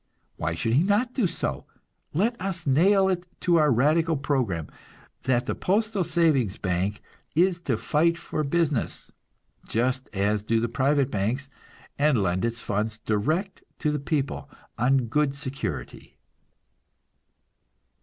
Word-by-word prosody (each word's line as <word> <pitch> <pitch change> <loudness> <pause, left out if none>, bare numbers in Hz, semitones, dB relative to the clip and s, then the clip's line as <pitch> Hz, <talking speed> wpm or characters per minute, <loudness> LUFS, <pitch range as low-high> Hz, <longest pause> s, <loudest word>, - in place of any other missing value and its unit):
Why 80 +1 -2
should 115 +7 -1
he 135 - +5
not 210 +7 +1
do 235 -8 +2
so? 70 - -3 0.4
Let 215 +9 +1
us 185 -3 -3
nail 190 +8 +4
it 180 -1 -1
to 175 -1 +3
our 155 -2 +4
radical 155 +6 +3
program 125 - -1 0.6
that 120 -1 +2
the - - -1
postal 210 0 0
savings 155 - +2
bank 95 +3 -2 0.3
is 175 +1 +3
to 130 -9 0
fight 170 +7 +2
for 155 - -3
business, 150 -3 -1 0.6
just 125 +3 -1
as 105 +1 +1
do 115 +2 +1
the 120 - 0
private 135 +3 +1
banks, 120 +7 -2 0.5
and 145 -2 +4
lend 90 0 0
its 115 0 -2
funds 105 +2 -1
direct 155 - -1 0.2
to 150 - 0
the 150 - -1
people 140 -1 -2 0.3
on 125 +2 +2
good 140 +4 +1
security. 135 -1 -6
140 Hz, 135 wpm, -26 LUFS, 115-170 Hz, 0.6 s, he